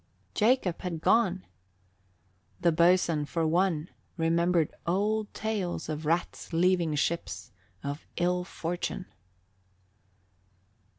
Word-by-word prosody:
Jacob 215 -6 +2
had 175 -3 -3
gone! 190 -1 +2 1.1
The 175 -1 +3
boatswain, 170 -2 +3
for 165 +2 -1
one, 170 -1 +1 0.3
remembered 170 0 +2
old 210 +4 +1
tales 200 -7 -2
of 155 0 -3
rats 170 +3 -1
leaving 170 -2 +2
ships 170 +3 -2 0.3
of 145 +2 -5
ill 180 +1 +1
fortune. 175 +1 -4
175 Hz, 95 wpm, -29 LUFS, 165-185 Hz, 1.1 s, The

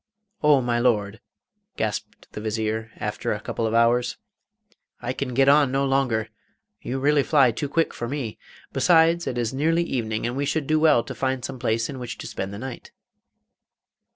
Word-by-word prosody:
'Oh, 150 -3 +5
my 120 -1 0
Lord!' 110 -4 +1 0.6
gasped - - -4
the 105 - -7
Vizier, 110 +1 -2
after - - -3
a - - -4
couple 115 - -3
of 110 - -1
hours, 120 +1 +3 0.8
'I 120 +1 -3
can 125 -2 -4
get 135 +1 +4
on 145 -1 +5
no 135 +1 +1
longer; 135 -5 +1 0.5
you 130 - -3
really 145 +2 +3
fly 135 -3 +4
too 140 +5 -4
quick 165 +2 +1
for 120 - -4
me. 125 -5 -4 0.3
Besides, 170 0 +4
it 120 - -2
is 120 0 -1
nearly 165 +5 +2
evening, 110 -8 -2
and 120 +1 -2
we 140 +1 -1
should 155 0 -1
do 155 +2 +2
well 155 -7 +4
to 135 - -7
find 130 0 -2
some 135 -2 -6
place 115 -2 0
in 135 -3 -7
which 120 -2 -6
to - - -8
spend 95 +1 -5
the 100 - -7
night. 130 +2 -8
125 Hz, 185 wpm, -24 LUFS, 115-140 Hz, 0.8 s, Oh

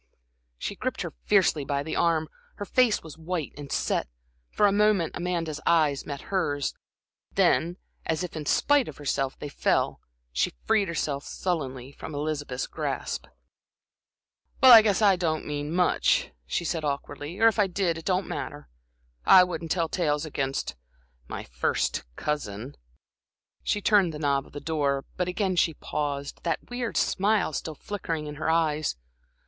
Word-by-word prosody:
She - - -4
gripped - - -3
her - - -6
fiercely 145 - +3
by 140 +1 -1
the 160 - -4
arm, 160 -2 +2 0.3
her 205 - -5
face 245 0 +3
was 160 -1 -11
white 165 -2 -3
and 145 -1 -9
set. - - 0 0.4
For 210 - +2
a 200 - +5
moment 205 -4 +2
Amanda's 170 -4 -2
eyes 155 -5 +3
met 140 -1 -5
hers. 145 -7 0 0.6
Then, 175 +2 +3 0.3
as 160 +2 0
if 180 - -6
in 150 -2 -5
spite 290 -3 +3
of - - -8
herself, 135 -2 -1
they - - -6
fell, 145 - +1 0.3
she - - 0
freed 210 -3 +3
herself 145 -4 -2
sullenly 135 -8 -3
from 145 +2 -8
Elizabeth's 145 -3 -2
grasp. - - -3 1.3
"Well, 260 - +9
I 225 - +12
guess 215 -1 +2
I 195 -3 +6
didn't 160 -3 -1
mean 145 0 -3
much," 180 +1 +2 0.2
she 170 - -1
said, 165 -1 -1
awkwardly, 145 +3 -4
"or 225 - +7
if 225 -1 +2
I 205 - +4
did, 180 -2 0
it 165 - -8
don't 185 0 +1
matter. 75 -3 -6 0.5
I 185 - +8
wouldn't 170 -2 -4
tell 165 0 +1
tales 150 -3 0
against 135 -3 -2 0.5
my - - -5
first - - -1
cousin" 130 -4 -3 0.9
She 210 - 0
turned 195 -7 +4
the - - -4
knob 140 -2 0
of - - -19
the 145 - -5
door, 140 -4 0
but 180 -1 -1
again 185 0 0
she 160 -2 +3
paused, 140 -1 -3
that 170 +7 -3
weird 245 -1 -2
smile 200 -4 +2
still 155 +2 -4
flickering 165 -4 -4
in 150 0 -7
her 160 - -1
eyes. 155 -2 +1
160 Hz, 165 wpm, -27 LUFS, 145-180 Hz, 1.3 s, I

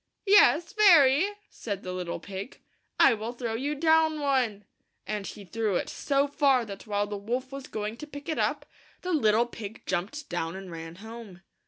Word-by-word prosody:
"Yes, 390 -4 +5
very, 345 -5 +6 0.2
said 200 -3 -5
the 185 - -5
little 180 -2 -4
pig. 195 +6 -8 0.2
" - - -46
I - - +3
will 225 +2 -4
throw 235 -2 -4
you 280 +6 -2
down 315 0 +3
one 255 -8 0 0.4
and 210 -1 -3
he 205 - -9
threw 215 +1 -1
it - - -1
so 280 0 0
far 275 -4 +2
that 200 0 -9
while 205 -1 0
the 205 0 -5
wolf 245 +6 -3
was 275 -1 -7
going 215 +1 -4
to 300 - -8
pick 285 -1 -10
it 320 - -2
up, - - 0 0.4
the 365 0 -1
little 225 -5 +3
pig 225 -2 -9
jumped 200 - -3
down 170 -1 -3
and 190 -2 -8
ran 165 0 -8
home. 220 -5 -10
230 Hz, 190 wpm, -28 LUFS, 200-285 Hz, 0.4 s, very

